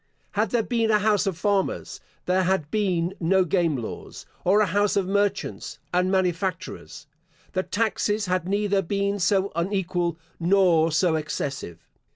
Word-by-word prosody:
Had 210 0 0
there 235 +1 +1
been 230 -2 0
a 215 - +5
house 210 -1 +2
of 185 -4 -1
farmers, 200 0 -1 0.3
there 185 +1 +2
had 185 -5 0
been 185 -4 0
no 185 +2 +3
game 170 -4 +1
laws; 115 -3 -7 0.2
or 195 +4 +4
a 215 - +4
house 205 +3 +1
of 190 -2 +1
merchants 200 0 -1 0.2
and 180 +1 +2
manufacturers, 185 -3 -2 0.5
the 185 - +1
taxes 210 0 -1
had 180 -1 -1
neither 200 0 +1
been 200 +2 -1
so 195 +1 +2
unequal 175 -1 -1 0.2
nor 170 -2 +3
so 160 +1 +2
excessive. 140 - -4
190 Hz, 150 wpm, -25 LUFS, 170-205 Hz, 0.5 s, a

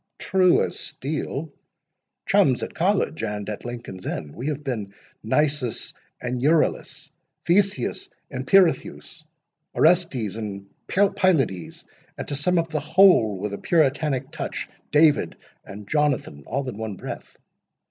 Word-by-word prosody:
"True 185 -2 +3
as - - -4
steel.—Chums 140 -2 -2
at - - -5
College 180 - 0
and 105 -2 -3
at 105 - -5
Lincoln's 120 -6 -7
Inn—we 80 - -5
have 150 -1 -3
been 110 -7 -4 0.3
Nisus 140 +1 0 0.3
and 125 0 -3
Euryalus, 155 +3 +1 0.3
Theseus 185 -7 +1 0.2
and 130 +1 -5
Pirithous, 175 -3 +2 0.5
Orestes 155 - +2
and 100 -3 -5 0.2
Pylades; 185 - +1 0.3
and, - - -5
to 145 - -2
sum 175 +6 +1
up 165 0 0
the 155 -1 -1
whole 155 - +5
with 100 +2 -4
a 100 - -5
puritanic 145 -4 +1
touch, - - -4 0.2
David 150 - +4 0.3
and 100 0 -10
Jonathan, 140 - 0
all 135 +3 -2
in 115 -4 -6
one 110 -3 -4
breath. - - -8
140 Hz, 125 wpm, -24 LUFS, 110-160 Hz, 0.5 s, whole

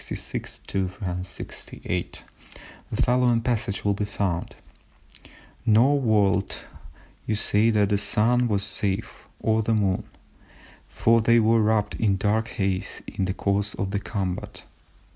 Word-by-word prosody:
lines - - -6 0.4
366 90 -1 -4
8) 90 -1 -3 0.7
the - - -4
following 125 -1 +3
passage 115 -4 -1
will 100 - +3
be 100 - -2
found:—"Nor 105 +6 -2
would 100 -5 +2 0.7
you 110 - +1
say 105 +2 +3
that 105 -3 +3
the 100 -1 +2
Sun 120 +4 +2
was 100 -3 +1
safe, 100 -1 -3 0.2
or 110 0 +2
the 110 +1 +1
Moon, 100 -3 +1 0.8
for 115 0 +3
they 115 +1 +5
were 115 0 +4
wrapt 105 -1 +2
in 100 -3 +2
dark 110 +3 +1
haze 95 -5 -2
in 95 - -3
the 95 - -1
course 100 +2 0
of 100 -1 -3
the 100 - 0
combat." 95 -4 -4
105 Hz, 130 wpm, -25 LUFS, 100-115 Hz, 0.8 s, they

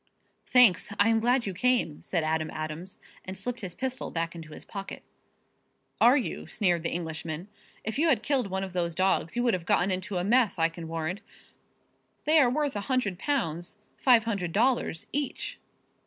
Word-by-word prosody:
"Thanks! 245 -6 +5
I 205 +2 +5
am 225 0 +3
glad 245 +2 +2
you 195 - -3
came," 235 -6 +1
said 170 -4 -1
Adam 155 0 0
Adams, 155 +4 -6 0.3
and 190 0 -6
slipped 240 +4 -4
his 185 -4 -5
pistol 260 -1 -3
back 165 0 -2
into 160 -2 -10
his - - -10
pocket. 195 -1 -7 1.0
"Are 245 +4 +6
you?" 255 - -3
sneered 180 -6 +1
the 165 - -2
Englishman. 160 +1 -4 0.3
"If 220 +5 -3
you 330 - +3
had 235 -7 +2
killed 270 -6 +1
one 190 0 -2
of 190 -2 -6
those 170 -2 -1
dogs 185 -2 +1
you 240 - +1
would 240 -2 +3
have 175 -2 -3
gotten 190 +2 +3
into 185 +1 -2
a 175 - 0
mess, 230 +2 +3
I 165 0 +3
can 165 0 -8
warrant. 165 +4 -3 1.0
They 310 +1 +5
are 260 -4 +5
worth 290 0 -1
a 205 - -2
hundred 215 -9 0
pounds 175 - -2 0.2
five 245 -4 +5
hundred 195 -7 -2
dollars 235 -6 +1
each." 285 -2 -3
195 Hz, 185 wpm, -28 LUFS, 170-245 Hz, 1.0 s, Are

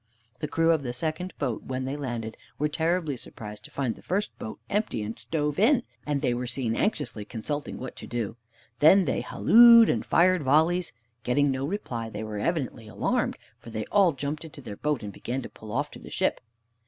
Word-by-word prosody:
The 150 - -2
crew 165 +2 +3
of 160 -3 +2
the 125 -3 -4
second 160 +7 -2
boat, 125 -6 -2
when 130 0 -3
they 135 +2 -3
landed, 120 -6 -4 0.2
were 150 - +1
terribly 160 0 0
surprised 105 -3 -9
to - - -10
find 130 -5 -1
the - - -16
first 200 +3 -2
boat 110 - -6
empty 205 - -1
and 110 +2 -4
stove 150 +6 -1
in, 245 +4 +4 0.2
and 145 -2 0
they 125 -4 +1
were 125 +1 -3
seen 120 -2 -2
anxiously 120 - -1
consulting 125 +7 -4
what 130 - -7
to - - -8
do. 115 -2 -3 0.4
Then 185 +5 +7
they - - 0
hallooed 235 0 +7
and - - +1
fired 185 0 +4
volleys. 160 +6 +3 0.3
Getting 145 +3 +2
no 135 +1 -2
reply, 120 - -4
they 105 0 -5
were 105 -1 -4
evidently 130 -5 -2
alarmed, 110 - 0 0.2
for - - -11
they 110 -1 -4
all 195 -5 +5
jumped 145 +3 -4
into 160 -2 -11
their 110 -7 -7
boat 150 -6 -1
and 100 -1 -6
began 125 +6 -4
to - - -7
pull 110 -1 -11
off 145 +6 -1
to - - -10
the - - -11
ship. - - 0
140 Hz, 205 wpm, -27 LUFS, 115-165 Hz, 0.4 s, Then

